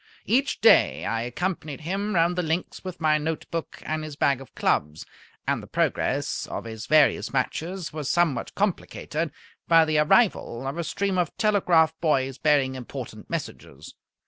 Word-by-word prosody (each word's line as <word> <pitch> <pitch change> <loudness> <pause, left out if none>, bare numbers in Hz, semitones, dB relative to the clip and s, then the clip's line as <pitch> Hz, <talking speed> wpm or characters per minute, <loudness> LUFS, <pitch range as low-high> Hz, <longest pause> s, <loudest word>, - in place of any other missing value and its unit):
Each 265 +4 +1
day 225 - +5
I 115 0 -1
accompanied 155 +4 -3
him 195 +6 -2
round 170 +1 +3
the 180 - 0
links 165 +1 -3
with 185 -1 -7
my 155 -1 +3
note 160 +1 -3
book 165 -1 -5
and 155 0 -2
his 155 -2 -7
bag 140 -2 +1
of 135 - -14
clubs, 75 +2 0 0.4
and - - 0
the - - -12
progress - - -1
of - - -5
his 110 0 -7
various 155 -1 +4
matches 165 +7 -2
was 150 -3 -4
somewhat 170 -7 +1
complicated 170 -5 -2 0.4
by 165 -1 +6
the 155 -1 +1
arrival 150 - +2
of 140 +5 -4
a - - -1
stream 195 +2 -1
of 175 -3 -2
telegraph 180 -7 +3
boys 135 -5 +1
bearing 145 -4 +3
important 130 -2 -8
messages. 70 +3 -6
155 Hz, 165 wpm, -25 LUFS, 135-180 Hz, 0.4 s, by